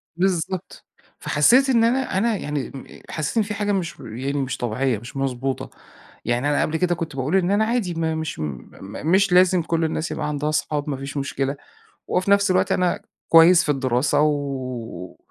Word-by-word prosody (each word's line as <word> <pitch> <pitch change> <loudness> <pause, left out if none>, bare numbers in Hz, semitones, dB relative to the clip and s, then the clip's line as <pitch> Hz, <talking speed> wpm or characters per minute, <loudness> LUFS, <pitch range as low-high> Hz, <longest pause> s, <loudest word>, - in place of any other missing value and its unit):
بالضبط، 185 0 -2 0.3
فحسِّيت 250 - +4
إن 235 -3 +4
أنا 245 -3 +1
أنا 225 +3 +2
يعني 145 -2 -4 0.4
حسِّيت 155 +7 -3
إن 220 - +4
في 210 - -4
حاجة 205 0 -1
مش 180 -5 -2
يعني 130 +5 -5
مش 135 -2 -2
طبيعية، 120 +1 -1
مش 120 +6 -10
مضبوطة، 135 0 -2 0.6
يعني 120 +5 0
أنا 145 - +2
قبل 160 - 0
كده 175 0 +1
كنت 165 -4 -5
باقول 135 +6 -1
إن 190 -1 +2
أنا 210 +2 +3
عادي 225 -6 -1
ما 160 -1 -1
مش 160 -1 -4
م 75 -5 -5 0.5
مش 195 +1 +4
لازم 180 0 +5
كُل 165 0 -1
الناس 160 +1 -2
يبقى 150 -2 -3
عندها 150 0 -2
أصحاب، 150 -1 -1
مفيش 140 +1 -5
مشكلة، 140 0 -2 0.5
وفي 185 +2 0
نفس 200 0 +4
الوقت 185 - +2
أنا 180 -1 0 0.3
كويِّس 165 +2 +7
في - - -6
الدراسة 135 +1 +1
و 130 - -3
155 Hz, 175 wpm, -22 LUFS, 135-185 Hz, 0.6 s, كويِّس